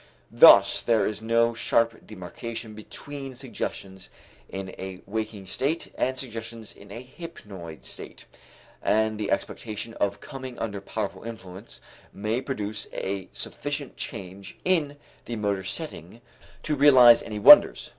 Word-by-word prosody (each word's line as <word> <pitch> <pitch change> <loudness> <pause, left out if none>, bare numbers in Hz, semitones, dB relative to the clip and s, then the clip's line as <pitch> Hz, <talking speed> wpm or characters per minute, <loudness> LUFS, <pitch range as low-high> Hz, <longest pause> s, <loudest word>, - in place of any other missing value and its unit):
Thus - - +8
there 110 -4 +2
is 105 - -3
no 115 +1 +2
sharp 115 0 0
demarcation 110 +3 -7
between 135 +5 -9
suggestions 100 -6 -6 0.4
in 95 0 -6
a 95 -1 -7
waking 110 -2 -4
state 140 - -2
and 130 0 -1
suggestions 115 -3 -6
in 100 0 -15
a 115 +4 -8
hypnoid 100 - -10
state. - - -9 0.6
And 110 0 +1
the 105 - -2
expectation 110 +2 -3
of 100 -2 -1
coming 130 -3 -8
under 105 -3 -4
powerful 105 +1 -4
influence 110 -3 -9 0.3
may 110 +5 -2
produce 105 -6 -5
a 95 -1 -4
sufficient 145 -2 -5
change 95 -2 -8
in 155 -6 +1 0.3
the 120 - -4
motor 100 -3 -1
setting 115 - -7 0.4
to 155 - -1
realize 130 -5 +8
any 105 - -6
wonders. 105 - +8
110 Hz, 130 wpm, -26 LUFS, 100-125 Hz, 0.6 s, Thus